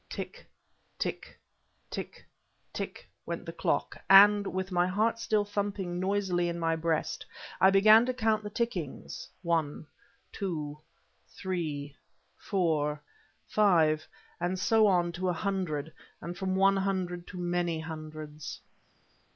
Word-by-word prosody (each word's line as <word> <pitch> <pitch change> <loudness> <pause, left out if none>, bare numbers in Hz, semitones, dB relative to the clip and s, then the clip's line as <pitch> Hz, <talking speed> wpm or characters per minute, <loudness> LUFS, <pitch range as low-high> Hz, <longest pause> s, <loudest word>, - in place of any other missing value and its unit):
Tick - - -7 0.5
tick - - -4 0.5
tick - - -6 0.5
tick - - -6 0.2
went - - -4
the - - -6
clock, - - -1
and, 200 +1 +8
with 190 +1 -3
my 175 0 +2
heart 220 +5 +1
still 215 -2 +1
thumping 200 -3 -2
noisily 185 -2 0
in 170 - -3
my 165 -1 +1
breast, 160 -1 -1 0.4
I 190 - +8
began 215 +4 +7
to 255 - 0
count 220 -3 +2
the 210 - -6
tickings; 205 - -4
one, 165 -3 0 0.5
two, 155 -7 -4 0.5
three, 155 -7 -4 0.4
four, 155 -6 0 0.5
five, 160 -7 +3 0.3
and 175 +2 -1
so 220 +3 +4
on 175 -3 +2
to 180 +2 -2
a - - +1
hundred, 160 -5 -2 0.3
and 170 +2 -6
from 190 +1 -2
one 195 +1 +4
hundred 185 -3 -2
to 180 - -9
many 175 -2 -1
hundreds. 155 -2 -7
180 Hz, 125 wpm, -30 LUFS, 160-200 Hz, 0.5 s, and